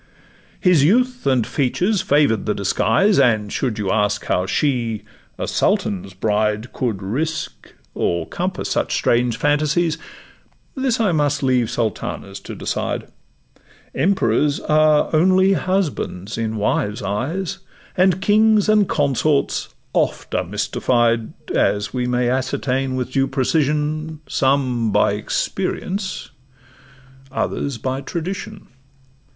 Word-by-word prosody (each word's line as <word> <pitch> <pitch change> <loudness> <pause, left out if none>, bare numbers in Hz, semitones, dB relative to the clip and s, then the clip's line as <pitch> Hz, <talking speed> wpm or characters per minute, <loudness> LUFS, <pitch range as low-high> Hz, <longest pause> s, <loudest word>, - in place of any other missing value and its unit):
His 180 -7 +4
youth 245 - +2
and 130 -4 +3
features 180 - 0
favour'd 145 - +2
the 105 - +1
disguise, 190 - +2
And, 110 -6 +2
should 125 -6 -1
you 100 -3 -1
ask 105 0 0
how 90 +1 0
she, 120 -4 0 0.3
a - - -3
sultan's 95 -1 0
bride, 105 +3 0
Could 110 -6 -2
risk 155 +11 -4 0.2
or 85 -1 -1
compass - - -3
such - - 0
strange 120 -1 +1
phantasies, 155 +3 +1 0.7
This 265 -4 0
I 215 -5 +2
must 145 -2 +1
leave 125 -3 +2
sultanas 115 -4 -3
to - - -6
decide: - - -3 0.8
Emperors 150 - +1
are 155 0 +3
only 185 +4 +4
husbands 160 - -2
in 110 -1 -2
wives' 105 0 -1
eyes, 160 - -2 0.4
And 185 0 +3
kings 215 0 +4
and 210 -2 +3
consorts 145 0 +1 0.2
oft - - -1
are - - +1
mystified, 115 +4 0 0.2
As 105 0 +1
we 125 -1 -1
may 125 0 +1
ascertain 130 +1 -1
with 125 0 -3
due 135 0 +1
precision, 150 +2 -1
Some 130 -4 +1
by 105 0 +3
experience, 185 - -3 1.0
others 135 0 -2
by 130 +3 -3
tradition. 190 +6 -5
135 Hz, 115 wpm, -20 LUFS, 110-170 Hz, 1.0 s, His